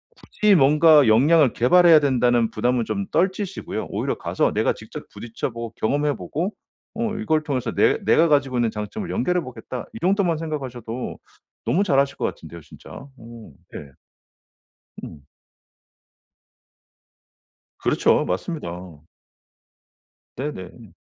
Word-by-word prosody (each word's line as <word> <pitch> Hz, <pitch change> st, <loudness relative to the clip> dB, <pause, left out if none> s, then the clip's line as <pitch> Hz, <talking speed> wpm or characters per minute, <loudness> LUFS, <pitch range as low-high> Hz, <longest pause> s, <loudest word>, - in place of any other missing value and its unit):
굳이 210 Hz, -2 st, +1 dB
뭔가 150 Hz, -1 st, +5 dB
역량을 140 Hz, +5 st, +4 dB
개발해야 165 Hz, +5 st, +5 dB
된다는 120 Hz, -4 st, +2 dB
부담은 120 Hz, +2 st, 0 dB
좀 200 Hz, 0 st, -3 dB
떨치시고요. 190 Hz, +2 st, -2 dB
오히려 -, -, -3 dB
가서 -, -, -1 dB
'내가 -, -, +1 dB
직접 -, -, -11 dB
부딪혀 115 Hz, +1 st, -6 dB
보고 115 Hz, 0 st, -6 dB
경험해 145 Hz, +5 st, 0 dB
보고 180 Hz, +8 st, -4 dB, 0.4 s
어 225 Hz, -1 st, -2 dB
이걸 160 Hz, -8 st, 0 dB
통해서 130 Hz, -6 st, -2 dB
내 -, -, +3 dB
내가 165 Hz, +1 st, +4 dB
가지고 135 Hz, -4 st, +1 dB
있는 115 Hz, -2 st, +1 dB
장점을 110 Hz, -, -6 dB
연결해 180 Hz, 0 st, 0 dB
보겠다.' 130 Hz, -2 st, -8 dB
이 -, -, -8 dB
정도만 185 Hz, -3 st, +1 dB
생각하셔도 130 Hz, -7 st, -6 dB, 0.5 s
너무 195 Hz, +5 st, +2 dB
잘하실 140 Hz, -4 st, +1 dB
것 -, -, -2 dB
같은데요 85 Hz, -, -7 dB
진짜. -, -, -16 dB
어. 115 Hz, -, -12 dB, 0.2 s
예. 70 Hz, -, -8 dB, 1.1 s
음. 70 Hz, -3 st, -11 dB, 2.6 s
그렇죠. -, -, +2 dB
맞습니다. 90 Hz, -, -5 dB, 1.4 s
네네. 110 Hz, -, -7 dB
135 Hz, 280 characters per minute, -22 LUFS, 115-165 Hz, 2.6 s, 뭔가